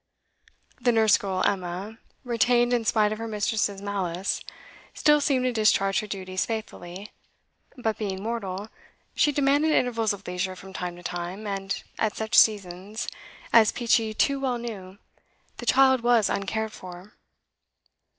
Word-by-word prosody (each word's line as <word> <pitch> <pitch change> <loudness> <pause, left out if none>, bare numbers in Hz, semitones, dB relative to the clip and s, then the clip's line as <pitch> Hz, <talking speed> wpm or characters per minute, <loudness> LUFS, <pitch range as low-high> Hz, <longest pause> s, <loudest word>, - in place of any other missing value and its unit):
The 245 - +3
nurse 220 -2 +5
girl 190 -2 -2
Emma, 195 +3 -2 0.2
retained 240 0 +2
in 235 -2 +1
spite 215 -2 +3
of 215 - -4
her 230 - -4
mistress's 210 -2 -1
malice, 190 -2 -2 0.5
still 295 -1 +4
seemed 265 -3 +1
to 255 - +2
discharge 205 -3 +3
her 215 - -5
duties 185 -2 -3
faithfully; 205 -3 -6 0.7
but, 225 -3 -2
being 195 -3 -3
mortal, 210 -3 -4 0.4
she 295 - +3
demanded 290 +2 +2
intervals 230 -5 +1
of 200 -1 -6
leisure 180 +1 -3
from 190 +1 -12
time 180 -2 -4
to 175 - -13
time, 175 +5 -5
and 195 -1 -3 0.2
at 220 -2 0
such 220 +2 -4
seasons, 200 +1 +2 0.5
as 220 -2 +7
Peachey 225 -2 +1
too 275 +4 +2
well 260 -3 -1
knew, 200 -5 -7 0.6
the - - -8
child 265 -2 +5
was 235 -3 +3
uncared 220 +2 -2
for. 180 +3 -11
215 Hz, 145 wpm, -26 LUFS, 190-235 Hz, 0.7 s, as